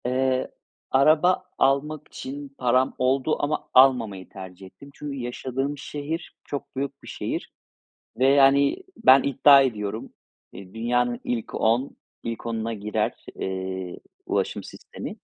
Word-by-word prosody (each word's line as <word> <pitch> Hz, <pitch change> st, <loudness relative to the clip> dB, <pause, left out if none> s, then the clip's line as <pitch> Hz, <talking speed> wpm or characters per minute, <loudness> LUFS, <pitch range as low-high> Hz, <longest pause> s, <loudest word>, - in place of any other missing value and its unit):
Eee, 130 Hz, +1 st, 0 dB, 0.4 s
araba 155 Hz, +7 st, +4 dB
almak 140 Hz, +3 st, +1 dB
için 140 Hz, +1 st, -7 dB
param 130 Hz, +1 st, +2 dB
oldu 130 Hz, +4 st, +1 dB
ama 150 Hz, +1 st, -2 dB
almamayı 115 Hz, -8 st, +4 dB
tercih 95 Hz, 0 st, -10 dB
ettim. 95 Hz, +9 st, -14 dB
Çünkü 145 Hz, -1 st, -6 dB
yaşadığım 130 Hz, +3 st, -3 dB
şehir 150 Hz, +3 st, -5 dB
çok 145 Hz, -1 st, -6 dB
büyük 140 Hz, +1 st, -4 dB
bir -, -, -12 dB
şehir -, -, -4 dB, 0.7 s
ve 130 Hz, -, +4 dB
yani, 140 Hz, 0 st, +5 dB, 0.2 s
ben 135 Hz, -, +6 dB
iddia 140 Hz, +1 st, +6 dB
ediyorum, 110 Hz, -4 st, -3 dB, 0.4 s
eee, 95 Hz, 0 st, -12 dB
dünyanın 120 Hz, +1 st, 0 dB
ilk 115 Hz, -2 st, -3 dB
on 120 Hz, +5 st, +1 dB, 0.3 s
ilk 115 Hz, 0 st, -5 dB
onuna 115 Hz, 0 st, -2 dB
girer, 105 Hz, 0 st, -2 dB
eee, 95 Hz, -1 st, -4 dB, 0.3 s
ulaşım -, -, -1 dB
sistemi. -, -, -9 dB
130 Hz, 125 wpm, -25 LUFS, 115-140 Hz, 0.7 s, ben